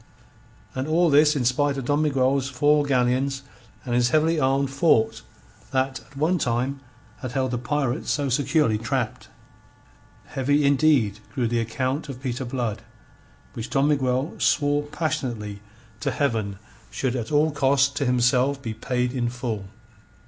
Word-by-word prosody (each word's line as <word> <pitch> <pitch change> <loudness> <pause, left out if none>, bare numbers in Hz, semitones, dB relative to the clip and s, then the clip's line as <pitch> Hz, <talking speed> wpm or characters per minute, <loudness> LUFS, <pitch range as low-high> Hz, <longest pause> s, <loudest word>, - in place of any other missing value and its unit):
And 130 +2 -3
all 165 +1 +3
this 150 +1 +5
in 130 -4 0
spite 140 +3 +1
of 135 - -4
Don 145 +3 +1
Miguel's 135 -2 +1
four 145 +3 +3
galleons 135 +1 +1 0.4
and 120 - -3
his 120 0 +3
heavily 155 +3 +2
armed 135 0 +1
fort 135 -5 +2 0.5
that 130 0 -1
at 140 - -18
one 165 +5 +1
time 125 +2 -1 0.4
had 130 -3 -6
held 130 -1 0
the 125 - -1
pirates 140 +1 -2
so 145 -1 0
securely 135 -3 +1
trapped. 115 0 -3 1.0
Heavy, 145 +2 +1
indeed, 140 -7 +3 0.2
grew 125 -3 +1
the 120 +1 0
account 130 +6 -2
of 130 -2 -6
Peter 130 -1 -3
Blood, 120 -4 -3 0.7
which 115 +1 -6
Don 140 +1 +2
Miguel 130 0 0
swore 145 0 +2
passionately 120 -11 -3 0.4
to - - -1
Heaven 110 -8 -1 0.3
should 130 -2 -2
at 120 0 -4
all 150 +1 +3
costs 140 -1 +3
to 140 0 -3
himself 125 +2 +2
be 115 -5 -5
paid 125 +2 -2
in 120 -3 -1
full. 120 -5 -4
135 Hz, 150 wpm, -24 LUFS, 125-145 Hz, 1.0 s, this